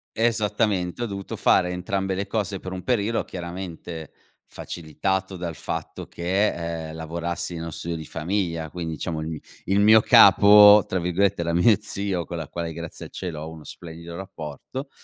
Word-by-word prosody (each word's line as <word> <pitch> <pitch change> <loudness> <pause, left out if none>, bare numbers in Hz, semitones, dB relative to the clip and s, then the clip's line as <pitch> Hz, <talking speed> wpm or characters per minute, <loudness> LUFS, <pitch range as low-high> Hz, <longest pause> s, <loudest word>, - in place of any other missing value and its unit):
Esattamente, 110 -3 0
ho - - 0
dovuto 100 -2 -6
fare 90 -1 +3
entrambe 95 +1 -2
le 100 +1 -3
cose 100 -2 -2
per 95 0 -7
un 90 - -6
periodo, 115 -2 0
chiaramente 85 -3 -7 0.3
facilitato 95 +4 -3
dal 85 -3 -5
fatto - - -5
che, 85 -3 -1
ehm, - - -8
lavorassi 85 +1 -4
nello 85 0 -5
studio 85 +2 -4
di 80 -1 -6
famiglia, 85 -1 -2
quindi 80 -1 -5
diciamo 80 +1 -4
il 80 - -4
mi 80 -2 -5 0.3
il 100 +2 +2
mio 110 +2 +7
"capo", 105 0 +8
tra 95 - -2
virgolette, 90 +2 +1
era 85 0 -1
mio 95 +5 +5
zio, 95 -4 -3
con 85 - -6
la 80 -3 -5
quale, 85 -1 -4
grazie 85 0 -8
al - - -12
cielo, 85 -5 -5
ho 80 - -7
uno 80 -1 -11
splendido 85 +1 -9
rapporto. 95 - -7
90 Hz, 170 wpm, -24 LUFS, 85-100 Hz, 0.3 s, capo